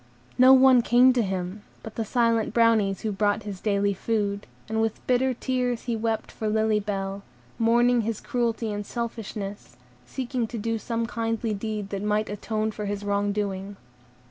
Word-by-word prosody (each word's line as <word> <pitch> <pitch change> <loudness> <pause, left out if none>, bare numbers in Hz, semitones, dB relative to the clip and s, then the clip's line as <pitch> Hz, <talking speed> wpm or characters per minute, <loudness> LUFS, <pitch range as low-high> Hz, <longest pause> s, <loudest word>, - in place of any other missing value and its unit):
No 255 +1 +8
one 260 -1 +7
came 250 +2 +5
to 245 - +2
him, 190 0 -3 0.2
but 220 - -8
the 225 - -2
silent 230 0 +1
Brownies 225 -4 +3
who 215 - -2
brought 205 +1 0
his 200 -3 -7
daily 200 -1 +1
food; 205 0 -2 0.2
and 220 0 -1
with 225 -1 -2
bitter 255 +1 +2
tears 250 -2 -1
he 235 -2 -2
wept 225 0 -2
for 215 - -3
Lily 220 0 +2
Bell, 195 -1 -3 0.4
mourning 240 +1 +4
his 225 -1 -3
cruelty 230 -3 -1
and 205 0 -3
selfishness, 215 -3 -6 0.3
seeking 250 - -3
to 235 - -6
do 225 +1 -2
some 230 +1 -2
kindly 225 -1 -2
deed 210 -1 -4
that 195 -1 -3
might 210 +1 0
atone 215 +1 -2
for 210 0 -5
his 205 0 -3
wrong 205 0 0
doing. 200 -1 -3
220 Hz, 170 wpm, -26 LUFS, 205-230 Hz, 0.4 s, No